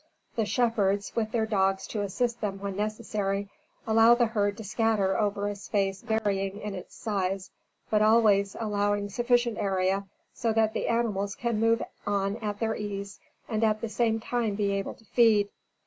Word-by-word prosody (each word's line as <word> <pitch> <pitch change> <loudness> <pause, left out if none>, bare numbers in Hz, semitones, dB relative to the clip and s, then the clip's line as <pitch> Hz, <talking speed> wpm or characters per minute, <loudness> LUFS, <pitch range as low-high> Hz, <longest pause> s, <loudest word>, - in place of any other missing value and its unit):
The 225 -3 0
shepherds, 205 -5 +1
with 220 -2 0
their 225 -2 +1
dogs 195 -3 +1
to 210 - -2
assist 235 +4 -1
them 195 -2 -2
when 195 -1 -4
necessary, 205 -1 -2 0.4
allow 225 +1 +6
the 240 0 +3
herd 205 -3 0
to 220 - -7
scatter 215 -2 +1
over 205 -1 0
a 205 - -1
space 195 -1 -1
varying 205 -3 -1
in 210 -1 -5
its 185 - -9
size, 195 -3 -2 0.4
but 215 -1 +3
always 215 -3 +4
allowing 205 -2 0
sufficient 240 +1 +1
area 195 0 0 0.3
so 230 -2 0
that 220 0 +2
the - - -2
animals 210 -4 0
can 235 -3 -1
move 230 +1 +3 0.2
on 200 0 0
at 210 -3 -4
their 220 -1 0
ease 200 -1 -5 0.3
and 220 -1 -1
at 215 -1 +2
the 230 - -3
same 225 +1 +1
time 225 -2 -1
be 200 -1 0
able 195 0 -2
to 225 - -22
feed. 215 -3 +4
210 Hz, 175 wpm, -28 LUFS, 200-225 Hz, 0.4 s, allow